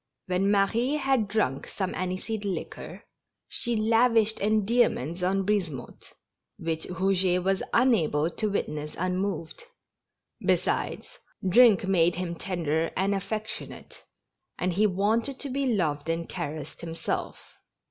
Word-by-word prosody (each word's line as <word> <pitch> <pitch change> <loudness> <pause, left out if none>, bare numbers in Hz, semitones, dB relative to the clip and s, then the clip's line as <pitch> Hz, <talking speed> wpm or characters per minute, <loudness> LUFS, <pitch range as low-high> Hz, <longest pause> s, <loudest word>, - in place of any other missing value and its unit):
When 185 +2 +1
Marie 220 +7 +2
had 270 -7 +1
drunk 200 -11 0
some 190 -2 -3
aniseed 185 +4 -3
liquor, 195 -3 -5 0.4
she 235 -1 -2
lavished 225 0 +3
endearments 210 - +1
on 190 +1 +1
Brisemotte 175 -11 -3 0.4
which 165 -1 -3
Eouget 180 0 +1
was 195 +1 +1
unable 170 - +3
to 215 +3 -2
witness 150 -6 -3
unmoved; 185 - -2 0.8
besides, - - -1 0.3
drink 215 0 +6
made 175 -2 +3
him 175 -1 -3
tender 165 -3 -1
and 195 +2 +2
affectionate, 215 - -5 0.5
and 180 0 0
he 210 +4 +3
wanted 220 +7 0
to 285 - -4
be 275 +1 0
loved 155 -5 -1
and 165 0 -1
caressed 150 0 -6
himself. 165 -1 -5
195 Hz, 115 wpm, -27 LUFS, 170-220 Hz, 0.8 s, drink